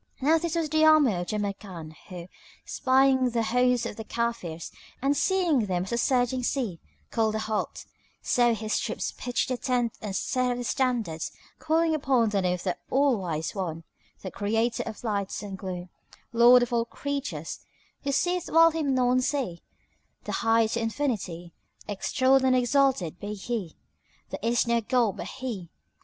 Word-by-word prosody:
Now 310 +4 +3
this 340 0 -2
was 330 -2 0
the 310 +1 +2
army 310 -7 +6
of 175 -1 -3
Jamrkan 195 -6 -4 0.2
who, 175 -2 -8 0.4
espying 260 0 +3
the 230 -1 0
host 250 +1 +2
of - - -5
the 220 - -5
Kafirs 225 -9 -3 0.3
and 275 +2 +1
seeing 335 - +2
them 180 -1 0
as 190 - -7
a 235 - 0
surging 250 0 +1
sea, 240 - -2 0.3
called 220 -1 +1
a - - +1
halt; 215 0 -3 0.3
so 240 -3 +2
his 215 0 -1
troops 225 - -3
pitched 245 +1 -2
the 255 - -1
tents 245 -3 -1
and 205 -3 -4
set 255 +3 0
up - - -5
the 245 - -4
standards, 235 -11 -1 0.3
calling 320 +1 +2
upon 265 -6 +2
the 200 -2 0
name 180 -1 +1
of 180 - -8
the 180 - -1
All 275 -1 +3
wise 165 -6 -3
One, 165 -5 -4 0.4
the 185 - -5
Creator 225 +3 0
of 220 - -7
light 200 -4 -2
and 200 -2 -6
gloom, 185 -1 -6 0.4
Lord 240 +1 +7
of 245 - -3
all 230 -1 +2
creatures, 285 +3 -4 0.4
Who 280 - -2
seeth 355 +5 0
while 330 0 +6
Him 300 -4 0
none 255 0 +3
see, 250 - -2 0.6
the - - -5
High 225 0 +3
to 230 +2 -2
infinity, 215 - -3 0.3
extolled 260 +6 +2
and 260 -1 +4
exalted 255 - +2
be 210 +1 -5
He! 205 -4 -4 0.5
There - - -4
is 235 +3 +2
no 235 0 +2
God 230 -2 +1
but - - -5
He! 230 -10 -6
235 Hz, 175 wpm, -27 LUFS, 200-265 Hz, 0.6 s, Lord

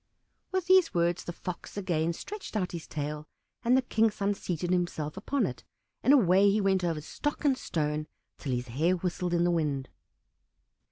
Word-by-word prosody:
With 375 -2 0
these 370 - +5
words 170 0 +1
the - - -5
Fox 180 +3 -7
again 170 -4 0
stretched 405 - -6
out 185 -3 -1
his 170 -2 -6
tail, 150 0 -4 0.4
and 250 +2 +4
the 260 - +2
King's 225 -3 +2
son 200 0 +1
seated 175 -2 -3
himself 170 -4 -1
upon 235 +5 0
it, 125 -6 -5 0.4
and 265 - +4
away 200 -7 +6
he 205 +2 +2
went 190 -2 +2
over 165 -3 0
stock 295 - -3
and 275 -2 +4
stone 150 - -2 0.3
till 140 - -3
his 125 0 -2
hair 160 +10 +2
whistled 180 0 -1
in 170 - +3
the 175 - +3
wind. 145 -5 -1
175 Hz, 180 wpm, -29 LUFS, 155-210 Hz, 0.4 s, away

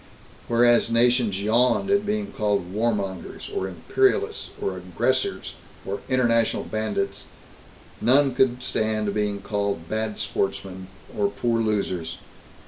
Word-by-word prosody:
Whereas 120 0 +4
nations 115 -3 +3
yawned 125 - +2
at 200 +1 +2
being 210 0 -1
called 100 -4 -1
"warmongers" 105 -4 -2
or 95 - -1
"imperialists" 85 -4 0
or 95 - -2
"aggressors" 90 -1 -1 0.3
or 100 +1 -3
"international 115 -3 +2
bandits," 110 -2 -3 0.8
none 135 +2 +4
could 125 0 +2
stand 110 -3 0
being 105 -1 -1
called 100 -4 -2
"bad 110 +1 -2
sportsmen" 95 -1 -3 0.3
or 200 - +2
"poor 120 -10 0
losers." 95 -6 -1
110 Hz, 115 wpm, -24 LUFS, 100-120 Hz, 0.8 s, Whereas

